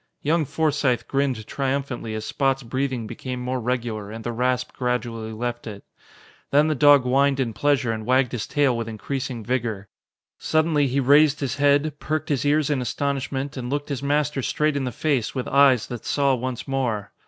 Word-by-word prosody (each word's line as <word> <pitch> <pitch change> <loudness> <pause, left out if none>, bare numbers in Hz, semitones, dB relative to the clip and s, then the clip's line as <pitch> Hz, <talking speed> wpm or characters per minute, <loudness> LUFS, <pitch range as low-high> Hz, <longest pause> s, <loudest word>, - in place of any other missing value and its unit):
Young 155 +2 +2
Forsythe 140 -5 0
grinned 135 -5 -1
triumphantly 135 -4 -3
as 110 0 -4
Spot's 135 +2 0
breathing 130 -1 -2
became 125 +3 -6
more 125 +1 -2
regular 115 -4 -3
and 110 +1 -7
the 120 - -2
rasp 125 +2 0
gradually 120 -3 -2
left 120 +2 -4
it. 100 -2 -8 0.7
Then 150 +2 +4
the - - +2
dog 145 -1 +6
whined 135 +2 +2
in 120 -4 -1
pleasure 130 +1 +1
and 110 -1 -4
wagged 130 +1 +2
his 120 -4 -4
tail 140 -4 +2
with 115 -1 -3
increasing 125 +1 -4
vigor. 115 -6 -2 0.5
Suddenly 155 -2 +2
he 135 +2 0
raised 145 +2 +5
his 135 -2 -2
head, 145 +1 +2
perked 155 0 -2
his 140 -4 0
ears 150 0 +2
in 140 -3 0
astonishment 135 +2 -2
and 125 -1 -4
looked 145 +2 -3
his 140 -3 -3
master 145 0 0
straight 150 +3 0
in 140 -2 -1
the 125 - -2
face 140 -4 -1
with 130 - -3
eyes 135 -4 +4
that 120 -3 -7
saw 140 -2 +2
once 125 -1 -4
more. 120 -7 -2
130 Hz, 185 wpm, -23 LUFS, 120-140 Hz, 0.7 s, dog